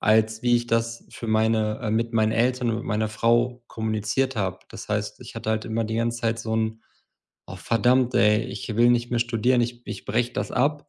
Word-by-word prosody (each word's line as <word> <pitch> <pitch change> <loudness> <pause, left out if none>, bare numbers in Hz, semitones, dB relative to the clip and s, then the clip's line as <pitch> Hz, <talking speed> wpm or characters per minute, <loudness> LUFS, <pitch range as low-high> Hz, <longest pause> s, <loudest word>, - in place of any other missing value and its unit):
als 110 +1 +3
wie 120 -1 +4
ich 120 0 -2
das 115 0 -1
für 115 - -8
meine, 110 0 +1
äh 105 - -1
mit 115 +2 0
meinen 110 -1 +2
Eltern 120 +1 +1
und 110 - -1
mit 115 - -6
meiner 110 +1 0
Frau 120 +3 +1
kommuniziert 110 +4 -1
habe. 95 -3 -2
Das - - -10
heißt, - - -2
ich - - -11
hatte 110 - -3
halt 110 0 -1
immer 115 +1 -1
die 110 +1 -3
ganze 115 +1 -1
Zeit 115 0 0
so 110 0 -3
'n 110 0 -1 0.6
„Oh, - - -8
verdammt, 125 +2 +2
ey, 105 -2 +4
ich 110 - -5
will 120 +1 +5
nicht 120 0 +1
mehr 120 - +1
studieren. 120 +1 +2
Ich 120 0 -4
ich - - -7
breche 120 0 0
das - - -3
ab. 145 +3 0
115 Hz, 220 wpm, -24 LUFS, 110-120 Hz, 0.6 s, will